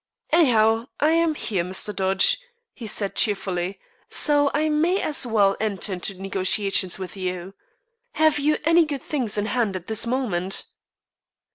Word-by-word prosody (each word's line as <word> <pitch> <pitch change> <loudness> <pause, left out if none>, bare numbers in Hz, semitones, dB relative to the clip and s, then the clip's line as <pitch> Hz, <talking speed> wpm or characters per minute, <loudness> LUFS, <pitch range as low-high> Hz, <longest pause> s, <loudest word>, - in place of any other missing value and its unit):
"Anyhow, 230 -7 +3
I 300 +2 +3
am 330 -1 +2
here, 195 -11 -2
Mr. 190 +3 -2
Dodge," 190 0 +3 0.4
he 230 - -9
said 200 -1 -2
cheerfully, 190 -3 -1 0.3
"so 290 -1 +2
I 305 +2 0
may 325 +5 +1
as 285 -4 0
well 200 -4 +3
enter 210 -2 -2
into 185 +1 -4
negotiations 195 0 +1
with 185 -1 -8
you. 185 0 -5 0.6
Have 310 -1 +2
you 300 +1 +1
any 330 +2 +5
good 285 -4 -5
things 245 -9 -1
in 205 - 0
hand 225 -4 -1
at 180 -2 -6
this 220 +2 0
moment?" 200 -8 -1
215 Hz, 150 wpm, -23 LUFS, 190-290 Hz, 0.6 s, any